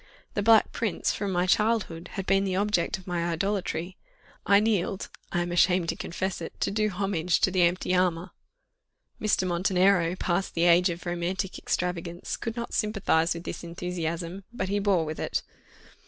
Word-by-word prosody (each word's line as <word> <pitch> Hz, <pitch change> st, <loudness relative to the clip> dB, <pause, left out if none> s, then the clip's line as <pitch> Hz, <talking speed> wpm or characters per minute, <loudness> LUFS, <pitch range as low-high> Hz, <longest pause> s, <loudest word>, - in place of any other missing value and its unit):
The 205 Hz, -, 0 dB
Black 220 Hz, +1 st, +5 dB
Prince, 225 Hz, -6 st, -1 dB
from 200 Hz, -2 st, -2 dB
my 180 Hz, 0 st, +1 dB
childhood, 200 Hz, -4 st, +1 dB
had 195 Hz, -2 st, -4 dB
been 195 Hz, 0 st, +3 dB
the 190 Hz, -2 st, -1 dB
object 200 Hz, -3 st, +1 dB
of 190 Hz, -, -15 dB
my 175 Hz, -2 st, -2 dB
idolatry. 180 Hz, -1 st, -2 dB, 0.5 s
I 200 Hz, 0 st, +6 dB
kneeled 205 Hz, -3 st, 0 dB, 0.2 s
I 175 Hz, -1 st, +1 dB
am 175 Hz, -, -4 dB
ashamed 175 Hz, 0 st, +3 dB
to -, -, 0 dB
confess 190 Hz, +1 st, -3 dB
it 165 Hz, -, -8 dB
to -, -, +1 dB
do 215 Hz, +1 st, +1 dB
homage 180 Hz, -3 st, 0 dB
to 190 Hz, -, +3 dB
the 185 Hz, 0 st, +2 dB
empty 175 Hz, +1 st, +2 dB
armour. 180 Hz, -1 st, +1 dB, 0.9 s
Mr. 210 Hz, -3 st, +2 dB
Montenero, 180 Hz, 0 st, +2 dB
past 185 Hz, +1 st, -1 dB
the 170 Hz, -, +1 dB
age 175 Hz, +1 st, +5 dB
of 170 Hz, +1 st, -5 dB
romantic 175 Hz, +2 st, -2 dB
extravagance, 175 Hz, 0 st, -3 dB
could 230 Hz, 0 st, -5 dB
not 235 Hz, -1 st, -5 dB
sympathize 195 Hz, -6 st, +1 dB
with 170 Hz, -, -7 dB
this -, -, -6 dB
enthusiasm, 170 Hz, +1 st, -4 dB
but 190 Hz, -6 st, -3 dB
he 205 Hz, +1 st, +1 dB
bore 195 Hz, -5 st, +2 dB
with 155 Hz, 0 st, -5 dB
it. -, -, -2 dB
180 Hz, 175 wpm, -27 LUFS, 170-200 Hz, 0.9 s, I